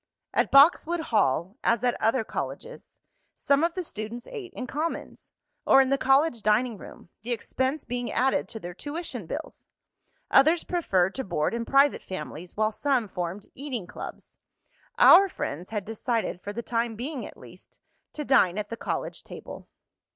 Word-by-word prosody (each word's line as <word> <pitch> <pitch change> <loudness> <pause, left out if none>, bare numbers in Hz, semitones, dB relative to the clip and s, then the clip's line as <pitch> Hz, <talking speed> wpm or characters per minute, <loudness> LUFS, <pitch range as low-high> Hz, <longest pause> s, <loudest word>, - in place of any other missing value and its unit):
At - - +2
Boxwood 320 +4 +5
Hall, 200 - 0
as 230 0 +2
at 245 -1 +2
other 225 +1 +2
colleges, 480 - -7 0.4
some 280 +2 +2
of 335 +1 +1
the 365 - -2
students 225 -4 -6
ate 415 -7 -8
in 255 - -5
"commons," 305 +6 -5 0.3
or - - +6
in 265 -1 +4
the 275 - +2
college 270 -2 +3
dining 215 +3 +2
rooms, - - -13
the 235 +4 -5
expense 260 +5 -2
being 245 -1 -3
added 265 +3 +1
to 220 - -6
their 175 -2 -7
tuition 305 - -6
bills. - - -7 0.6
Others 315 +5 +5
preferred 190 - +1
to 265 - -4
board 170 -3 -1
in 230 0 -2
private 275 +2 +4
families, 175 0 -8
while 215 0 +2
some 255 -2 0
formed 180 +2 -5
"eating 260 -8 -5
clubs." - - -10 0.6
Our 390 +3 +8
friends 175 - -5
had 210 -3 -3
decided, 225 -3 -2
for 205 - -5
the 235 +3 -5
time 230 -1 -1
being 260 +4 -5
at - - -10
least, - - -16 0.4
to 300 - -5
dine 200 -9 +4
at 210 -1 -3
the 230 - -4
college - - -4
table. - - -10
240 Hz, 165 wpm, -26 LUFS, 210-280 Hz, 0.6 s, Our